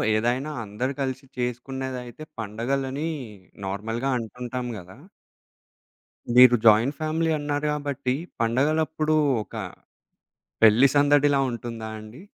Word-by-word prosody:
ఏదైనా 125 +7 0
అందరూ 110 +6 -3
కలిసి 130 0 -3
చేసుకునేదైతే 125 +2 -4 0.2
పండుగలని 135 +8 -2 0.6
నార్మల్‌‌గా 115 +7 -3
అంటుంటాం 125 +2 -5
గదా! 95 +4 -12 1.4
మీరు 125 -1 +9
జాయింట్ 115 +6 +5
ఫ్యామిలీ 160 +1 0
అన్నారు 145 0 -2
కాబట్టి 145 -3 -2 0.3
పండుగలప్పుడు 155 +6 +1 0.3
ఒక 115 - -14 1.1
పెళ్లి 115 +5 +7
సందడిలా 145 -1 +4
ఉంటుందా 115 -2 -6
అండి? 110 +7 -11
130 Hz, 90 wpm, -25 LUFS, 115-145 Hz, 1.4 s, మీరు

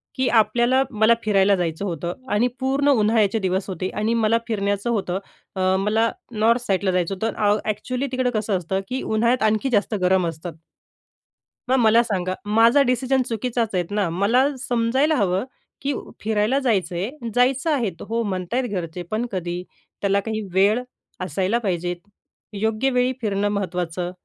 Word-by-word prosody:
की 260 0 0
आपल्याला, 240 +5 +3
मला 220 +1 +4
फिरायला 200 -1 +3
जायचं 175 +1 -2
होतं 170 -1 -3 0.2
आणि 230 +4 +3
पूर्ण 275 +2 +1
उन्हाळ्याचे 220 -4 +3
दिवस 190 0 -1
होते 185 0 -3
आणि 215 +2 0
मला 225 +2 +3
फिरण्याचं 205 0 -1
होतं, 195 -5 -1 0.4
अ, 185 0 +2
मला 220 +3 +2 0.2
नॉर्थ 230 +3 +2
साईडला 190 -1 +1
जायचं 180 +1 0
होतं. 220 +3 -2
अ, 210 0 +2
ॲक्चुअली 250 +6 -2
तिकडं 255 -1 0
कसं 210 -2 0
असतं, 185 +2 -2
की 260 +1 -2
उन्हाळ्यात 235 +2 +1
आणखी 215 +5 0
जास्त 215 -1 +1
गरम 185 -1 +3
असतात. 165 +1 -6 1.1
मग 260 - +4
मला 225 0 +5
सांगा, 185 -5 -2
माझा 230 +6 +5
डिसिजन 260 +1 +1
चुकीचाच 230 0 -1
आहे 180 - +2
ना? 205 -4 0
मला 205 +10 +2
समजायला 250 +6 +1
हवं, 195 -2 +1 0.4
की 280 +1 -1 0.3
फिरायला 220 +5 +1
जायचं 195 -9 0
आहे, 235 - -4
जायचं 260 +5 +2
आहे 245 -8 +1 0.2
हो 230 +1 0
म्हणत 185 -1 -4
आहेत 250 -2 0
घरचे, 175 -2 -4
पण 220 +3 0
कधी 180 -1 -3 0.4
त्याला 200 0 +2
काही 220 +1 -3
वेळ 205 +5 +3 0.4
असायला 190 +7 0
पाहिजेत. 180 -4 -2 0.6
योग्य 220 +5 0
वेळी 250 0 +2
फिरणं 205 -1 0
महत्त्वाचं. 180 -3 -2
210 Hz, 160 wpm, -22 LUFS, 190-240 Hz, 1.1 s, मला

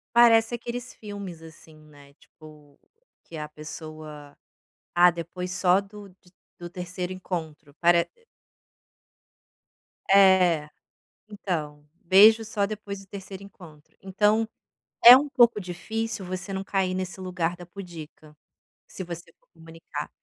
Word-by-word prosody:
Parece 230 -1 +6
aqueles 240 +1 -6
filmes, 200 -6 -9
assim, 160 0 -15
né, 145 -2 -18
tipo, 150 -1 -18 0.4
que 170 - -12
a 150 -1 -6
pessoa: 155 -1 -10 0.6
"Ah, 175 0 +6
depois 175 +2 -6
só 185 0 +3
do 205 0 -12
de 180 -1 -24 0.3
do 175 0 -8
3º 180 0 -5
encontro", 160 -6 -7
pare 170 0 +4 2.0
É. 185 -6 +5 0.6
Então, 155 -8 -5 0.2
"Beijo 215 +5 +6
só 210 -2 -1
depois 200 -1 -7
do 195 - -15
3º 195 0 -9
encontro". 165 -6 -16
Então, 210 +3 +1 0.6
é 240 +1 +13
um 290 +2 -2
pouco 240 -5 +4
difícil 210 +4 -5
você 185 +1 -6
não 190 0 -3
cair 190 -2 -1
nesse 185 0 -5
lugar 180 -2 -2
da 175 0 -11
pudica, 165 -4 -11 0.5
se 185 - -7
você 170 -1 -9
for - - -38
comunicar. 165 0 -9
180 Hz, 125 wpm, -25 LUFS, 160-200 Hz, 2.0 s, é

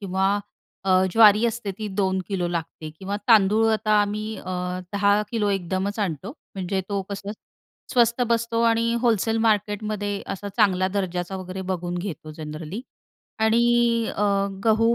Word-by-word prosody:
किंवा 195 +1 +1 0.5
अ, 195 - 0 0.2
ज्वारी 215 0 +7
असते 230 -3 -3
ती 215 - -4
2 190 -1 0
किलो 180 -3 -1
लागते 165 -2 -5
किंवा 195 +1 -3
तांदूळ. 215 0 +5
आता 215 0 0
आम्ही 210 +1 -2
अ, - - -11 0.5
10 200 +1 +3
किलो 220 -3 0
एकदमच 195 +2 -2
आणतो. 190 - -3 0.2
म्हणजे 190 0 -2
तो 200 -1 -1
कसं 200 0 -5 0.6
स्वस्त 235 0 +3
बसतो 230 0 +1
आणि 230 0 +2
होलसेल 225 -2 +2
मार्केटमध्ये 210 -1 0
असा 200 +1 -5
चांगला 185 -4 +3
दर्जाचा 185 -1 -2
वगैरे 185 0 -6
बघून 175 -1 -2
घेतो 175 -4 -6
जनरली 155 +5 -6 0.6
आणि 220 +1 +4 0.6
अ, 205 - 0 0.4
गहू 225 +1 +4
200 Hz, 140 wpm, -24 LUFS, 190-220 Hz, 0.6 s, ज्वारी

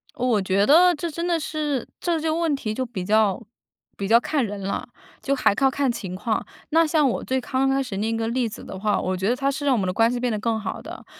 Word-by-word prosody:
哦， 250 - -2
我 220 -5 +2
觉 190 +1 +2
得 350 +6 +6
这 330 +3 -4
真 335 +3 -3
的 345 -1 +2
是， 295 -4 -2
这 340 -2 0
些 320 - 0
问 320 -1 +1
题 220 -6 -3
就 255 +3 -2
比 225 -7 -5
较 215 +1 +2 0.5
比 200 - -3
较 225 +3 +6
看 270 +2 0
人 205 -1 -6
了， 195 +1 -3 0.3
就 275 - 0
还 255 -6 +3
靠 270 +6 +3
看 270 -1 0
情 190 -6 -6
况。 215 +3 -2 0.2
那 325 +1 +4
像 305 -3 +3
我 - - -2
最 260 0 -1
刚 265 +1 0
开 270 0 +1
始 230 -7 -6
那 220 +3 -1
个 225 0 -1
例 245 0 0
子 215 - -9
的 190 - -8
话， 210 +1 +1
我 185 0 -2
觉 190 +2 -1
得 240 - +2
它 275 +2 0
是 285 +1 -4
让 275 - +4
我 - - 0
们 195 - 0
的 185 - 0
关 225 +4 +3
系 245 - -2
变 245 0 -1
得 215 - -2
更 225 +1 0
好 215 - -5
的。 - - -10
245 Hz, 295 characters per minute, -23 LUFS, 210-285 Hz, 0.5 s, 得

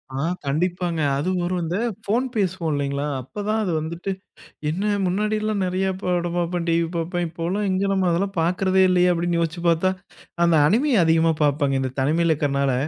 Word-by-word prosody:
ஆ. 135 - -2 0.2
கண்டிப்பாங்க. 170 +3 -1 0.2
அதுவும் 180 +4 -1
ஒரு 180 +1 -1
இந்த 170 +4 -2 0.3
ஃபோன் 235 +6 +1
பேசுவோம் 185 -6 0
இல்லைங்களா, 140 0 -1 0.2
அப்பதான் 210 - -2
அது 185 - -1
வந்துட்டு, 170 +5 -4 0.6
என்ன 195 +7 -1
முன்னாடிலாம் 215 +2 0
நறைய 185 +1 0 0.2
படம் 175 -1 -1
பாப்பேன் 175 0 -1
டிவி 165 0 +2
பாப்பேன். 175 +1 -2
இப்பெல்லாம் 175 +5 -2
எங்க 190 +1 0
நம்ம 190 -1 +1
அதெல்லாம் 195 +2 -1
பாக்கிறதே 185 +3 +2
இல்லையே! 180 0 +4
அப்டின்னு 170 0 0
யோசிச்சு 165 +1 -3
பார்த்தா, 170 +3 +2 0.5
அந்த 170 -1 +4
அணிமி 250 - +2
அதிகமா 165 0 +3
பாப்பங்க. 140 -2 +1
இந்த 130 -1 -3
தனிமைல 160 +4 +2
இருக்கறனால. 140 -2 0
175 Hz, 160 wpm, -23 LUFS, 160-190 Hz, 0.6 s, இல்லையே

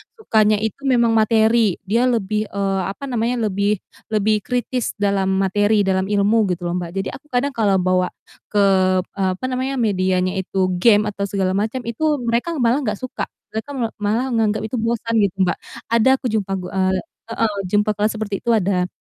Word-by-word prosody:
sukanya 215 - +2
itu, 220 +4 -3
memang 235 -3 +3
materi, 220 -2 +3
dia 230 +6 +1
lebih, 215 -2 0
eee, 195 -1 -1
apa 195 +8 -7
namanya, 245 -2 -1 0.2
lebih 200 +2 +1 0.3
lebih 215 0 +1
kritis 250 +2 -2
dalam 200 -2 0
materi, 205 +2 +2
dalam 190 0 0
ilmu 205 +1 +2
gitu 175 - -13
loh, 175 - -2
Mbak. 170 -1 -6
Jadi 195 - -2
aku 300 +2 -12
kadang 265 +1 0
kalau 210 -6 +1
bawa 185 0 +2 0.4
ke, 205 -1 +2 0.4
eee, 190 -1 -2
apa 255 - -6
namanya, 260 +2 -2
medianya 185 -5 0
itu 190 0 -1
game 210 +1 +5
atau 200 0 -4
segala 190 -2 0
macam, 220 +6 -1
itu, 295 +7 0
mereka 235 +9 0
malah 235 +4 +3
nggak 215 -7 -2
suka, 255 +4 -5 0.2
mereka 220 +5 -5
me 240 -4 0
malah 225 +5 0
nganggap 215 -2 +1
itu 225 +2 -3
bosan 230 0 0
gitu, 200 -3 +1
Mbak, 175 -2 0 0.3
ada 230 +2 +4
aku 265 - -10
jumpa, 205 -3 -1
gu 180 -1 -5
eee 190 0 +1 0.3
heeh. 225 -2 -1
jumpa 205 +3 +2
kelas 210 +1 +2
seperti 205 -2 -3
itu 235 - -4
ada. 185 -3 +1
215 Hz, 185 wpm, -20 LUFS, 195-235 Hz, 0.4 s, game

